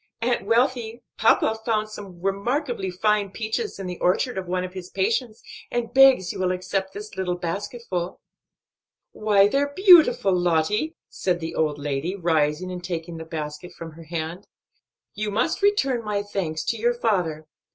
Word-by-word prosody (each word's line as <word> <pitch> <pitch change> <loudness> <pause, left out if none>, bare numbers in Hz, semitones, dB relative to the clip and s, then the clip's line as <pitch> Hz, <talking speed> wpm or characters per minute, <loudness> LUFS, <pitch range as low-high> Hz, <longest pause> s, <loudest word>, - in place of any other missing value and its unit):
Aunt 235 -3 0
Wealthy, 235 0 +1 0.2
papa 220 0 +3
found 215 -2 0
some 200 -4 -10
remarkably 230 +2 -1
fine 205 +2 +1
peaches 220 - -3
in 195 - -6
the 180 -1 -5
orchard 195 +7 +1
of 190 -1 -4
one 180 +1 -1
of 185 0 -6
his 185 -1 -8
patients, 220 +3 -1 0.3
and 240 -1 -3
begs 265 -9 +6
you - - -7
will 185 -1 +1
accept 190 +1 -2
this 210 0 -8
little 185 -2 -1
basketful." 180 +1 -4 0.9
"Why, 205 -2 +4
they're 285 +5 0
beautiful, 345 - +6
Lottie!" 180 - +1
said 180 -2 -1
the 160 -1 -5
old 150 -2 0
lady, 145 +5 -2
rising 165 -1 0
and 180 -1 -6
taking 170 -1 -4
the 160 - -7
basket 155 +1 -6
from 165 -1 -8
her 165 +1 -13
hand. 165 +3 -5 0.7
"You 215 0 -3
must 230 - 0
return 275 - +2
my 210 -1 -1
best 205 0 -14
thanks 160 -5 -2
to 230 - -1
your 240 +2 +1
father. 180 -10 0
195 Hz, 165 wpm, -24 LUFS, 175-230 Hz, 0.9 s, begs